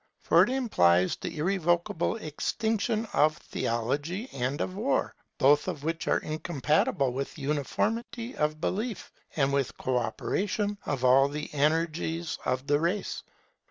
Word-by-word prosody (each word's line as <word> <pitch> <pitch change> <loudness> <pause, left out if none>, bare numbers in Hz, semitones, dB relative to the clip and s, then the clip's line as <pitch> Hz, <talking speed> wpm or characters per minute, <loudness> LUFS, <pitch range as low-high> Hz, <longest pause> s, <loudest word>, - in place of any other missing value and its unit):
For - - +5
it - - +4
implies 95 - +3
the - - -6
irrevocable 175 +2 +1
extinction 220 +5 -1
of 155 +1 +3
theology 145 - -2
and 135 +2 -2
of 185 - -2
war; 220 +8 0 0.2
both 145 +2 +4
of 145 - -4
which 165 +1 -2
are - - +3
incompatible 150 -4 0
with 135 +4 -4
uniformity 225 - -2
of 150 0 0
belief 215 +6 -3 0.2
and 140 -2 +2
with 140 -2 0
co 130 -1 0
operation 200 - -2
of 135 -3 -1
all 135 +2 +6
the 150 +1 -6
energies 160 +2 0
of 130 +1 -1
the 145 0 +2
race. 175 +6 -1
155 Hz, 135 wpm, -28 LUFS, 140-195 Hz, 0.2 s, all